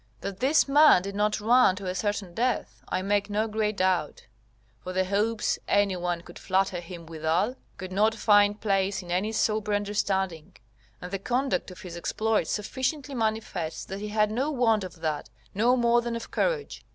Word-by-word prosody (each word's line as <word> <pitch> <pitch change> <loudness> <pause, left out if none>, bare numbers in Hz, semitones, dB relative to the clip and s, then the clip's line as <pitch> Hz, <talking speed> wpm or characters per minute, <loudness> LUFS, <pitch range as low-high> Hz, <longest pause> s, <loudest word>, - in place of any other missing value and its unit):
That 195 -1 -5
this 280 +6 +3
man 290 -9 +6
did 200 +1 -5
not 210 +1 0
run 230 -2 +4
to 200 0 -8
a 180 - -2
certain 200 -1 -2
death, 245 +3 -2
I 185 - -1
make 205 +1 0
no 210 +2 0
great 215 -1 -1
doubt; 185 -5 0 0.5
for 185 +9 -7
the 185 0 +1
hopes 210 +3 0
any 200 -2 +2
one 175 -1 -2
could - - -13
flatter 190 -1 0
him 170 -1 -9
withal, 165 +7 0 0.2
could 185 -1 -7
not 215 +4 +2
find 205 -1 +4
place 195 -2 0
in 175 - -9
any 190 +5 0
sober 215 -1 0
understanding, 195 -5 -2 0.5
and 180 - -7
the 195 - -2
conduct 245 -2 -1
of 185 - -11
his 175 -2 -8
exploit 215 +5 0
sufficiently 260 +6 -2
manifests 220 -8 -2
that 195 +1 -6
he 210 - -5
had 210 0 +1
no 260 +7 0
want 230 -7 +2
of 180 -3 -9
that, 155 -2 -2 0.2
no 235 +5 +3
more 240 0 +3
than 235 0 -3
of 230 - -7
courage. 485 -3 -1
205 Hz, 185 wpm, -27 LUFS, 185-225 Hz, 0.5 s, man